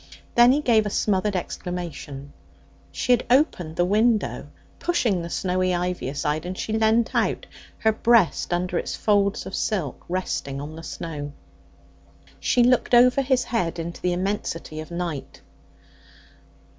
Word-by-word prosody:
Then 240 +1 +7
he 290 +3 +2
gave 220 -6 +3
a - - -1
smothered 205 0 0
exclamation. 170 -6 -5 0.6
She 160 - -1
had 245 - +4
opened 240 - +2
the 175 - +2
window, 215 +3 +1 0.3
pushing 235 - +1
the 170 - -6
snowy 185 0 0
ivy 180 -5 -2
aside, 150 +2 -2
and 185 +1 -5
she 215 - -3
leant 220 +1 +2
out, - - 0 0.3
her 220 - +3
breast 225 -5 +3
under 175 0 0
its - - -4
folds 200 -1 +1
of 190 - -8
silk 180 - -2
resting 170 -6 -3
on 150 +2 -7
the 165 - -8
snow. 150 -3 -6 1.1
She 245 - +3
looked 250 0 +3
over 250 +3 +6
his 260 -2 +1
head 180 -9 -1
into 170 +1 -6
the 180 - +1
immensity 175 -4 -3
of 155 - -7
night. 170 -5 -5
185 Hz, 145 wpm, -24 LUFS, 170-225 Hz, 1.1 s, Then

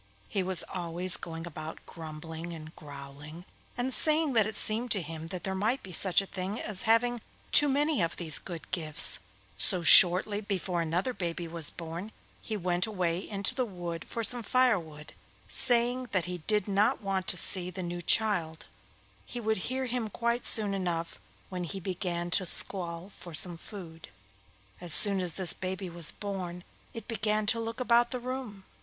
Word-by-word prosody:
He 200 - -2
was 185 -1 +2
always 175 0 +1
going 165 0 -7
about 160 -1 -9
grumbling 160 +1 -8
and 155 -1 -11
growling, 145 +2 -11 0.3
and 250 +2 -1
saying 310 -1 +2
that 220 -3 +3
it 215 - -5
seemed 230 +3 +1
to 200 - 0
him 160 +1 -7
that 180 +1 -6
there 190 - -2
might 215 +7 -1
be 190 - -10
such 185 +2 +2
a - - -9
thing 195 +3 -5
as 205 -3 0
having 240 +1 +2 0.3
too 295 -1 +6
many 290 - +1
of 165 0 -1
these 160 -4 -1
good 170 -3 -9
gifts; 155 -3 +2 0.4
so 185 -4 +2
shortly 185 +6 +7
before 190 -4 -3
another 175 +9 -2
baby 170 -3 -4
was 165 -2 +2
born 170 +5 -8 0.3
he 220 - -5
went 180 0 -1
away 180 -5 -2
into 200 -2 -2
the 255 - -1
wood 175 -6 -6
for 230 - -5
some 245 +2 +3
firewood, 200 -12 0 0.3
saying 245 +1 +2
that 185 -4 +1
he 180 0 -5
did 210 +4 -1
not 210 +5 +1
want 195 -1 -2
to 180 - -2
see 180 +1 +2
the 185 +1 -6
new 175 0 -5
child; 175 -6 +1 0.6
he 245 - -7
would 220 -1 -1
hear 260 0 -2
him 245 -3 -3
quite 235 +3 -2
soon 210 -3 +3
enough 170 -3 -4 0.3
when 180 -1 -5
he 195 +3 -5
began 175 -2 -4
to 185 - +2
squall 175 0 0
for 175 -3 -10
some 175 +2 +5
food. 165 -3 -11 0.7
As 175 -2 +5
soon 200 -2 +9
as 175 -3 -1
this 185 -3 +1
baby 185 0 -5
was 170 -2 +1
born 185 -4 -6 0.3
it 230 - -9
began 215 -1 -1
to 230 +2 +1
look 230 +1 -5
about 240 -1 +3
the 250 - -4
room. 245 -5 -7
185 Hz, 180 wpm, -29 LUFS, 170-220 Hz, 0.7 s, soon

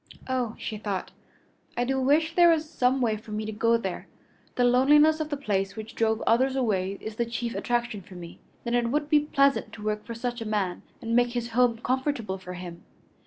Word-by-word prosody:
"Oh!" 250 -4 -1
she 215 -2 -5
thought, 200 -3 -3 0.7
"I 245 - +2
do 265 +1 0
wish 310 +5 +2
there 345 0 +6
was 320 -2 +2
some 260 -3 +1
way 220 -3 +1
for 215 - -15
me 215 0 -3
to 220 - -4
go 230 +2 +2
there. 190 -5 -5 0.5
The 250 - +2
loneliness 295 +6 +5
of 310 -1 -3
the 290 - -2
place 200 -7 -1
which 220 +1 -8
drove 220 -1 0
others 260 +4 +3
away 200 -6 0
is 220 0 -7
the 235 - +1
chief 235 0 -3
attraction 240 -3 -1
for 185 +1 -14
me. 170 -1 -10 0.2
Then 235 - -3
it 240 -1 +2
would 295 +3 -1
be 300 - +6
pleasant 280 -2 +2
to 210 - -9
work 210 0 -2
for 230 - -7
such 240 +1 -4
a - - -4
man 200 -4 -1 0.2
and 230 0 -1
make 245 0 +3
his 240 -1 -2
home 240 0 +2
comfortable 255 -7 -1
for 180 -1 -8
him. 175 -1 -9
235 Hz, 215 wpm, -27 LUFS, 215-265 Hz, 0.7 s, there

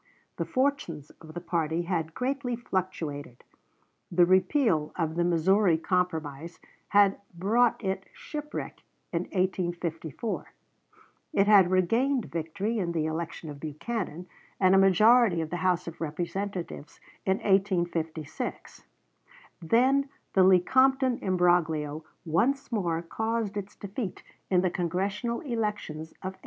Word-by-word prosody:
The - - -1
fortunes 255 - -1
of 155 0 -12
the - - -3
party 165 -1 -1
had 165 -3 -2
greatly 255 -1 -1
fluctuated. 165 - -4 0.7
The 175 0 +5
repeal 185 - +2
of 160 -3 -1
the 170 +1 +1
Missouri 175 +1 +3
Compromise 165 -3 -2 0.3
had 200 -1 +4
brought 225 +7 +2
it 190 -1 -2
shipwreck 300 -12 -6 0.3
in 170 +1 0
1854; 175 - -3 0.8
it 195 - +4
had 200 -4 +6
regained 230 +8 +2
victory 180 +8 -2
in 170 -3 -1
the 160 -2 0
election 165 +1 -4
of 145 - -10
Buchanan, 175 +3 -4 0.3
and 185 -1 +5
a 195 - +6
majority 210 +1 +5
of 160 -1 -3
the 175 - -1
House 180 -1 0
of 170 0 -8
Representatives 175 +1 -4 0.2
in 190 0 +1
1856; 175 -6 -1 0.8
then 260 - +3 0.2
the 190 - +4
Lecompton 260 +8 +4
imbroglio 165 -5 +1 0.2
once 245 - +1
more 170 -7 -1
caused 220 +3 -2
its 205 -1 -5
defeat 200 0 -5 0.3
in 180 -2 +4
the 185 -1 +1
Congressional 195 +7 -2
elections 210 - -3
of 190 0 -3
1858. - - -24
185 Hz, 120 wpm, -28 LUFS, 165-215 Hz, 0.8 s, had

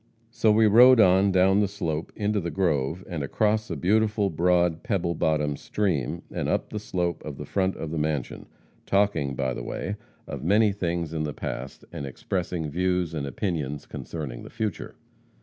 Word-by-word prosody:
"So 115 -2 +3
we 110 +1 +5
rode 120 +4 +8
on 95 0 +5
down 95 +2 +4
the 105 - +3
slope 85 -6 -3
into 105 0 0
the 85 -2 -3
grove, 85 -2 0
and 85 -4 -4
across 110 +9 0
a 85 - -2
beautiful 105 +4 +2
broad 85 0 +2
pebble 95 -8 -1
bottom 75 -3 0
stream, 85 -5 -2
and - - -2
up - - -1
the 105 - -3
slope 90 -4 -2
to 75 - -6
the - - -7
front 95 -1 0
of 80 - -5
the 80 - -2
mansion, 75 -3 -2 0.4
talking, 100 -9 +1
by 65 -1 -1
the - - -5
way, 100 - -4 0.3
of - - -6
many 105 +5 +4
things 85 -4 -2
in 80 - -2
the 75 -1 -3
past, - - -6
and 70 - -5
expressing 85 +3 -3
views 90 0 0
and 70 -3 -3
opinions 75 - -3
concerning 70 -7 -6
the - - -10
future. 110 -5 -4
90 Hz, 180 wpm, -26 LUFS, 75-100 Hz, 0.4 s, rode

